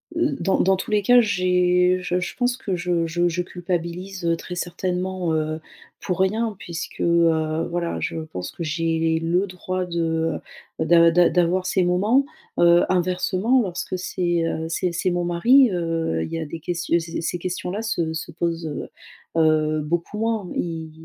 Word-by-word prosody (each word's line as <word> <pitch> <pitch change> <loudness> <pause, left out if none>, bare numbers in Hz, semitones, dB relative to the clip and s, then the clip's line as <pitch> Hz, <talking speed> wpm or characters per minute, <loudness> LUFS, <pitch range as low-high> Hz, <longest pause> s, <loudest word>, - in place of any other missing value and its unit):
heu, 330 -2 0
dans 195 - +1
dans 190 +1 +4
tous 190 - -5
les 210 -1 +3
cas 245 +4 +6
j'ai 180 -3 +2
je 180 0 -1
je 180 - -4
pense 245 0 +1
que 205 -7 -3
je 175 -1 0
je 175 +2 +1
je 175 +1 -1
culpabilise, 180 +1 -4
heu, 170 0 +2
très 180 - -8
certainement, 180 0 -2
heu, 155 0 -1 0.4
pour 180 -1 -2
rien 215 +3 +1
puisque, 170 -1 -6
heu, 165 -1 +2
voilà, 170 -1 -2
je - - -3
pense 90 0 -5
que 170 - -6
j'ai 165 0 0
le 175 +4 +1
droit 185 0 -3
de, 165 -1 -1 0.5
heu, 160 - +1
d'a 170 +1 +6
d'a 175 +1 +4
d'avoir 180 +1 +2
ces 185 0 +1
moments, 205 +10 +3 0.3
heu, 170 0 +6
inversement 185 +6 +1
lorsque 185 -1 -4
c'est, 175 -2 -1
heu, 160 0 -3
c'est 175 +2 -1
c'est 170 +2 0
mon 175 0 0
mari, 235 +9 +5
heu, 165 - -1
il - - -6
y - - -2
a 160 - -3
des 165 +2 -7
questi 170 +1 -1
heu, - - +4
ces 165 0 -5
ces 175 +1 -2
questions 180 0 -4
là 205 +3 -3
se 170 -8 -1
se 160 +1 -5
posent, 170 0 -2
heu 150 - -5 0.5
heu, 155 -1 +3
beaucoup 170 +6 -2
moins. 220 -4 -1
Il 160 -2 -3
175 Hz, 185 wpm, -23 LUFS, 165-185 Hz, 0.5 s, cas